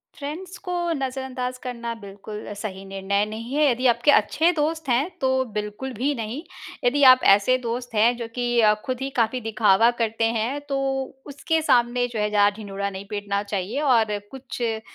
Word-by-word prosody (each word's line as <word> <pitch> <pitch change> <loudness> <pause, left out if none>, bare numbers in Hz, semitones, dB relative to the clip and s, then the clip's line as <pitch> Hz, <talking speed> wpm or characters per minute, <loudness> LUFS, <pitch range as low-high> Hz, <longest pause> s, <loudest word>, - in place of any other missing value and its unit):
Friends 330 +6 -7
को 360 - -1 0.2
नज़रअंदाज़ 260 -2 -4
करना 235 -2 -4
बिल्कुल 205 0 -9
अ, 205 - -5
सही 200 -2 -6
निर्णय 195 +1 -1
नहीं 225 +4 -7
है, 300 -2 +4
यदि 250 +2 -2
आपके 240 +4 +4
अच्छे 315 +10 +3
दोस्त 315 -2 -2
हैं, 265 +8 +2
तो 260 0 +2
बिल्कुल 210 +5 -4
भी 270 +7 0
नहीं। 230 +6 -4 0.4
यदि 275 +4 +2
आप 255 - +5 0.2
ऐसे 255 +6 +2
दोस्त 245 0 -5
हैं 230 +3 +4
जो 230 -1 -5
कि 240 -1 +1
अ, 210 -1 +6
खुद 255 0 -3
ही 270 - -2
काफ़ी 230 +2 +1
दिखावा 220 0 +4
करते 225 0 0
हैं, 250 +7 -1
तो 285 -1 -3 0.5
उसके 310 +3 -1
सामने 245 -3 +2
जो 230 -3 -5
है 210 0 +1
ज़्यादा 205 0 +3
ढिंढोरा 200 -2 -4
नहीं 195 0 -8
पीटना 200 -1 -2
चाहिए। 205 +7 -3
और 225 -7 +3
कुछ 265 -1 -8
अ, 225 -2 -1
235 Hz, 185 wpm, -24 LUFS, 210-265 Hz, 0.5 s, अ